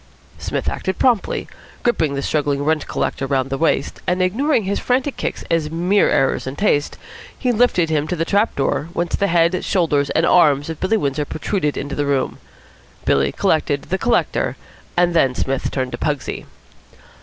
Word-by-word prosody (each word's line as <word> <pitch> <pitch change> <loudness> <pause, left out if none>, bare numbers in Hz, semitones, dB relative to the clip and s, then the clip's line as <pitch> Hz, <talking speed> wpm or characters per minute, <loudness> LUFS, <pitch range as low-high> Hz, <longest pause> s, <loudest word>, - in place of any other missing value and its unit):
Psmith - - -3
acted 190 -1 -2
promptly. 240 -6 +1 0.4
Gripping 160 -12 +1
the 140 - -3
struggling 145 -2 0
rent 155 0 0
collector 135 - -2
round 135 -1 0
the 135 - -1
waist, 160 -4 0
and 180 +1 +1
ignoring 225 +8 +1
his 195 +1 -1
frantic 260 +2 0
kicks - - -4
as 165 -2 +1
mere 180 +5 +2
errors 135 - +1
in 130 - -4
taste, 145 -6 +1 0.4
he 250 - 0
lifted 215 -8 +2
him 150 -1 +1
to 180 - -2
the 165 - -1
trap 205 +5 +1
door, 140 +3 -1
whence 175 -1 -1
the 200 - +1
head, 170 +1 +2
shoulders 150 -6 +1
and 165 - +2
arms 150 -4 +4
of 160 - -8
Billy 205 +4 +1
Windsor 145 -3 -1
protruded 155 0 -2
into 145 +1 -4
the 145 -1 -1
room. 140 -2 -1 0.7
Billy 70 0 +2
collected - - 0
the - - 0
collector, - - 0 0.4
and 175 0 +3
then 135 -6 +3
Psmith 135 +1 -1
turned 130 -2 -2
to - - -6
Pugsy. 150 -3 -3
160 Hz, 180 wpm, -20 LUFS, 140-185 Hz, 0.7 s, arms